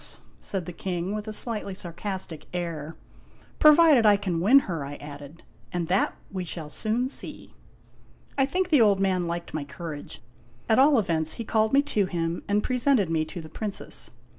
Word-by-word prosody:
" - - -29
said 190 -4 -4
the 180 - -7
King, 180 +2 -3
with 210 0 -5
a - - -3
slightly 215 -3 -3
sarcastic 185 -3 -5
air. 165 -3 -4 0.3
" - - -29
Provided 305 -4 +7
I 210 -2 +6
can 185 -4 -2
win 255 +9 +6
her," 165 - -4
I 140 +1 -6
added. 145 +2 -11
" - - -31
And 175 -2 -3
that 190 +3 +1 0.2
we 190 -2 -3
shall 160 -3 -5
soon 230 +7 0
see." 265 - -4 0.8
I 270 -1 +2
think 365 +5 -1
the 295 -7 +5
old 205 -3 +4
man 185 -3 +1
liked 170 0 -5
my 155 - -2
courage. 145 +1 -8 0.4
At 220 +2 +4
all 280 +1 +6
events, 160 -6 +1
he 230 - -5
called 220 0 +1
me 280 +1 +4
to 210 -9 0
him, 170 -1 -2
and 205 +1 +1
presented 250 - +2
me 160 -1 +1
to 175 +2 -7
the 155 - -10
Princess. 205 +4 -1
190 Hz, 190 wpm, -26 LUFS, 165-220 Hz, 0.8 s, Provided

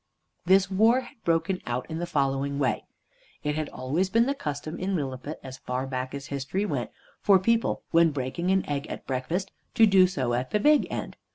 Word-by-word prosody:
This 195 +1 +4
war 225 +6 +4
had 230 - -15
broken 170 +3 +1
out 120 +1 -2
in 160 0 -4
the 175 - -3
following 140 -2 0
way. 140 -2 0 0.6
It 150 -1 0
had 155 0 -2
always 150 +9 -1
been 230 +4 +4
the 275 - +1
custom 155 - -5
in 190 +1 -1
Lilliput, 140 0 -4
as 130 -1 -8
far 125 +1 -3
back 130 0 -4
as 140 -1 -6
history 140 +9 -2
went, - - -2 0.3
for 200 -2 +6
people 230 +5 +1
when 165 0 +5
breaking 145 +5 -3
an 190 0 +2
egg 145 0 -2
at - - -7
breakfast 160 +9 -2 0.2
to 225 - +7
do 190 -3 +6
so 130 -9 -1
at 125 +2 -1
the 210 - +1
big 300 +6 +4
end. - - -5
160 Hz, 200 wpm, -27 LUFS, 135-190 Hz, 0.6 s, to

